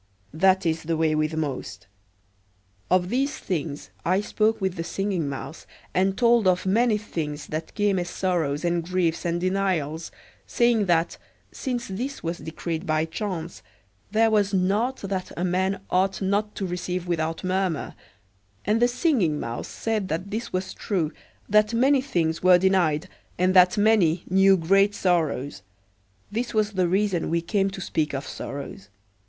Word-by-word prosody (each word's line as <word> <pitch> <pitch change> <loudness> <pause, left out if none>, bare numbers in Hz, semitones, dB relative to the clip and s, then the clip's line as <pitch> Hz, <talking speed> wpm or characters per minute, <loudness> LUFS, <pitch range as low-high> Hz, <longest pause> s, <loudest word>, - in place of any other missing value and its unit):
That 190 +3 +3
is 160 -1 0
the 165 0 -2
way 160 -1 +2
with 155 +1 0
most. 140 -9 -4 1.0
Of 180 -1 +2
these 270 +6 0
things 155 -5 -4
I 185 +3 +2
spoke 215 +1 +1
with 190 -2 -1
the 165 - -4
Singing 185 -4 -2
Mouse, 140 +4 -7 0.3
and 190 +1 +1
told 235 -4 +4
of 180 0 +2
many 220 +3 +3
things 150 -8 -5
that 155 +1 -5
came 205 -3 +2
as 175 0 -3
sorrows 170 -6 -1
and 170 -1 +1
griefs 175 -2 -1
and 170 0 0
denials, 180 -4 -1 0.4
saying 235 -4 +2
that, 170 -1 +1 0.3
since 245 -3 -3
this 245 +9 -5
was 170 +1 -3
decreed 160 +1 -5
by 155 0 +1
chance, 170 -1 -5 0.5
there 220 +2 +3
was 205 -2 +2
naught 205 +8 +1
that 190 -2 -3
a 175 - -1
man 190 +2 0
ought 190 +1 +1
not 205 +2 0
to 195 - -3
receive 180 0 -3
without 165 -1 -2
murmur; 185 -3 -1 0.7
and 215 +3 +2
the 240 - +6
Singing 245 - +1
Mouse 115 +1 -4
said 220 -4 -2
that 180 +4 -3
this 230 +3 -4
was 185 +1 -3
true, 175 -7 -2 0.3
that 210 +2 +3
many 265 +3 +4
things 165 - -1
were 185 0 +7
denied, 180 -3 +2 0.3
and 185 +1 +2
that 180 0 +6
many 205 -6 +3
knew 195 +1 +5
great 195 +4 +3
sorrows. 155 - 0 0.7
This 235 +2 -3
was 215 -1 +2
the 185 -3 +1
reason 190 -1 0
we 170 +1 +1
came 195 +3 0
to 195 0 -8
speak 150 -4 -1
of 135 - -4
sorrows. 135 -8 -7
185 Hz, 160 wpm, -25 LUFS, 165-205 Hz, 1.0 s, were